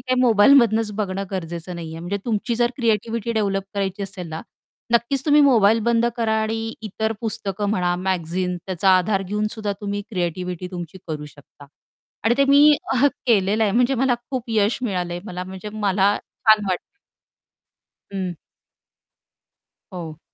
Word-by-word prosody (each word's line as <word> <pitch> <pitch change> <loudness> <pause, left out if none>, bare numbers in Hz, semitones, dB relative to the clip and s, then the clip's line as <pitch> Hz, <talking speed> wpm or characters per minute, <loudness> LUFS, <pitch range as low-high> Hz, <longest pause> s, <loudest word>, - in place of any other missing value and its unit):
काही 255 -1 0
मोबाईल 230 0 +6
मधनंच 225 -3 +3
बघणं 195 -1 -2
गरजेचं 175 -1 -5
नाहीये. 165 -1 -7
म्हणजे 175 +4 -3
तुमची 235 +1 -1
जर 240 +1 +2
क्रिएटिव्हिटी 230 -1 0
डेव्हलप 200 -3 0
करायची 195 0 -2
असेल 190 -3 -6
ना, 160 0 -5 0.5
नक्कीच 240 +3 +1
तुम्ही 295 0 +6
मोबाईल 225 -6 +5
बंद 235 0 +3
करा 225 -2 0
आणि 225 +1 -2
इतर 220 +1 -2
पुस्तकं 205 -3 -2
म्हणा, 180 -4 +1
मॅगझीन 180 0 -2
त्याचा 190 0 +2
आधार 195 +2 0
घेऊन 210 +3 -2
सुद्धा 210 -2 -3
तुम्ही 205 0 -3
क्रिएटिव्हिटी 180 -1 -3
तुमची 175 0 -7
करू 150 -2 -4
शकता. 145 0 -16 0.6
आणि 225 +1 +4
ते 275 - +5
मी 290 +2 +7 0.5
केलेलं 210 -2 +3
आहे. 205 - +1
म्हणजे 245 +4 +3
मला 260 0 +2 0.2
खूप 255 -3 -2
यश 215 0 +2
मिळालंय, 180 -6 -2
मला 180 -3 -5
म्हणजे 190 +2 -8
मला 205 -1 +2
छान 215 -1 +3
वाटतं. 180 -1 0 1.3
हं. 190 -2 -3 1.6
हो. 165 -4 -7
205 Hz, 150 wpm, -22 LUFS, 180-225 Hz, 1.6 s, मी